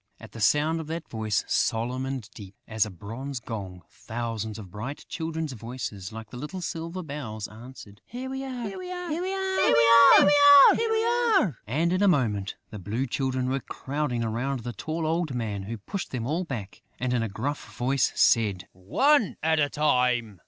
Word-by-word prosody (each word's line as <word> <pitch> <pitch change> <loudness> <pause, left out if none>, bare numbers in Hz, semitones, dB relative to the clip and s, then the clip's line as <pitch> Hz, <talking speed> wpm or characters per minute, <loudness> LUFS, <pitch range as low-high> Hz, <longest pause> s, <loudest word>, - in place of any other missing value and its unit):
At 110 - -12
the 115 - -9
sound 150 +9 +3
of 160 - -6
that 165 +1 -5
voice, 110 -2 -1
solemn 125 +4 0
and 130 -5 -4
deep 100 -3 -12
as 110 -1 +1
a - - -7
bronze 115 +9 -6
gong, 100 -7 -7
thousands 115 -2 -5
of 100 -5 -10
bright 120 +8 -6
children's 160 -3 -4
voices, 115 -5 -6
like 110 0 -10
little 150 +9 -6
silver 170 +1 -5
bells, 125 -9 -6
answered: 110 -2 -13
"Here 250 +2 -6
we 265 0 -4
are!... 250 -4 -5
Here 200 - -7
we 365 0 -7
are!... 360 -1 -5
Here 325 +3 -2
we 295 - +6
are!..." 460 - +2
And, 160 - +1
in 185 - +1
a 205 - +5
moment, 110 - +1 0.2
the 105 - -7
Blue 105 +8 -2
Children 130 0 -1
were 135 +1 0
crowding 130 -1 -3
round 125 +4 -2
the 120 +1 -5
tall 160 +8 -4
old 160 -3 -1
man, 105 -4 -3
who 115 +3 -5
pushed 185 - -5
them 120 -3 -4
all 165 +7 -1
back 115 - -7 0.2
and, 125 0 -1
in 120 - +1
a 115 - -2
gruff 140 +9 -5
voice, 130 +2 +1
said: 100 -5 +3
"One 220 - +2
at 160 0 +2
a 145 -1 +2
time!... 125 - +1
130 Hz, 180 wpm, -26 LUFS, 110-165 Hz, 0.2 s, we